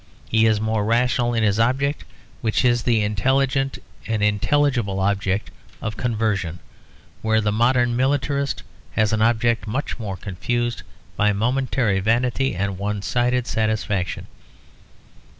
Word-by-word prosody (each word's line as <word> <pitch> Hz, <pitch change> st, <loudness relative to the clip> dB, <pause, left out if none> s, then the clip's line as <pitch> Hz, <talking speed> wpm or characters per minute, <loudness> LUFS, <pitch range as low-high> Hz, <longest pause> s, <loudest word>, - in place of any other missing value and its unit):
He 115 Hz, 0 st, +3 dB
is 110 Hz, -1 st, +2 dB
more 110 Hz, -1 st, 0 dB
rational 120 Hz, +2 st, +1 dB
in 115 Hz, -, +1 dB
his 105 Hz, 0 st, +2 dB
object, 135 Hz, +5 st, +1 dB, 0.4 s
which 115 Hz, 0 st, +1 dB
is 120 Hz, -1 st, +3 dB
the 115 Hz, -3 st, +2 dB
intelligent 130 Hz, +6 st, +1 dB, 0.3 s
and 110 Hz, -2 st, 0 dB
intelligible 105 Hz, -1 st, +1 dB
object 100 Hz, 0 st, 0 dB, 0.3 s
of 110 Hz, -2 st, -4 dB
conversion; 105 Hz, -7 st, -1 dB, 0.6 s
where 110 Hz, 0 st, +2 dB
the 105 Hz, -1 st, 0 dB
modern 120 Hz, +2 st, +2 dB
militarist 140 Hz, +2 st, 0 dB, 0.3 s
has 110 Hz, 0 st, +2 dB
an 110 Hz, -, +1 dB
object 115 Hz, 0 st, +2 dB
much 130 Hz, +4 st, -3 dB
more 100 Hz, -4 st, -4 dB
confused 120 Hz, +6 st, -2 dB, 0.3 s
by 105 Hz, 0 st, +2 dB
momentary 120 Hz, -1 st, +1 dB
vanity 120 Hz, +5 st, +1 dB
and 95 Hz, 0 st, -2 dB
one 100 Hz, 0 st, -2 dB
sided 125 Hz, +1 st, +1 dB
satisfaction. 110 Hz, -6 st, -1 dB
115 Hz, 130 wpm, -22 LUFS, 105-125 Hz, 0.6 s, He